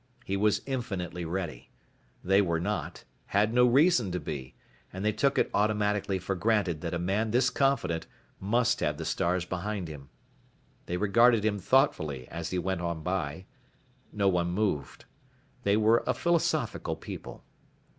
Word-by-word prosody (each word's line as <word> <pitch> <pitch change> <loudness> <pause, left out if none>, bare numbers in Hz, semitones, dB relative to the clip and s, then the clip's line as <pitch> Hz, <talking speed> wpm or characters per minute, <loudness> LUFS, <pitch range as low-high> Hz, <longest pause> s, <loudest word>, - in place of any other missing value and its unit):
He 95 - -1
was 105 +1 +2
infinitely 95 -10 -4
ready. 85 -7 -4 0.5
They 95 +2 +4
were 85 -4 0
not, 105 +4 -3 0.2
had 105 +3 +2
no 125 0 +5
reason 130 - +4
to 90 - -1
be, 65 -5 -6 0.4
and 95 +2 -5
they 105 - +3
took 135 +6 +1
it - - +2
automatically 105 -2 +1
for 95 +2 -3
granted 95 -5 0
that 85 0 -3
a - - 0
man 100 +6 0
this 125 +3 +2
confident 115 -13 0 0.3
must 120 +5 +1
have 75 -1 -1
the 80 - -5
stars 85 +2 0
behind 95 +1 -3
him. 75 -3 -10 0.8
They 90 - -2
regarded 110 +3 +4
him 105 -2 +1
thoughtfully 80 - +1
as 85 -1 -5
he 90 - -2
went 95 0 -1
on 85 -2 -3
by. 90 -1 -3 0.7
No 100 -2 0
one 90 -2 +2
moved. 90 -7 -2 0.6
They 100 +1 +2
were 110 +2 +4
a - - +1
philosophical 170 -1 0
people. - - -9
95 Hz, 155 wpm, -29 LUFS, 85-110 Hz, 0.8 s, no